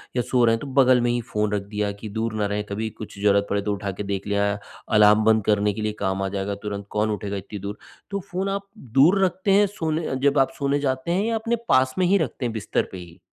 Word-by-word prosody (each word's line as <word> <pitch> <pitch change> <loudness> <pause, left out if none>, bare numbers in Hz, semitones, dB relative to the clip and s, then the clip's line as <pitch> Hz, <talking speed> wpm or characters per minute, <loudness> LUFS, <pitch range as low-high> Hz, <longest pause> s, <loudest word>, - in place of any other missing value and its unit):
या 125 - +2
सो 125 0 +1
रहे 115 0 +4
हैं - - -5
तो 145 - -6
बग़ल 130 -1 +5
में 120 - +1
ही 120 - 0
फ़ोन 105 -2 -2
रख 105 - 0
दिया, 105 0 -3
कि 100 +2 -8
दूर 110 +2 -2
न - - +1
रहें 105 0 -1
कभी 110 +2 -2
कुछ 105 -2 -10
ज़रूरत 100 0 +3
पड़े 100 0 0
तो 105 0 -1
उठा 100 0 -3
के 95 +2 -6
देख 100 0 -4
लिया, 100 0 +1 0.4
अलार्म 105 0 +6
बंद 110 -1 +4
करने 105 -1 +2
के 110 - -5
लिए 105 0 -1
काम 95 -1 -1
आ - - 0
जाएगा, 100 +1 -3
तुरंत 100 0 -6
कौन 105 +1 +1
उठेगा 100 0 -3
इतनी 100 +2 -7
दूर। 100 +2 -6 0.3
तो 200 - -1
फ़ोन 190 +2 -1
आप 200 0 -3 0.3
दूर 190 +7 +6
रखते 190 +2 -1
हैं 205 +1 +6
सोने 160 -6 -2
जब 140 0 +3
आप 135 - +3
सोने 140 0 +1
जाते 130 +3 -1
हैं 190 +3 +1
या 230 0 0
अपने 230 +2 0
पास 130 0 +3
में 185 - +3
ही 195 +3 +4
रखते 140 -5 -2
हैं 115 - -2
बिस्तर 110 -2 -1
पे 95 - -7
ही? 85 -2 -12
110 Hz, 265 wpm, -24 LUFS, 100-140 Hz, 0.4 s, अलार्म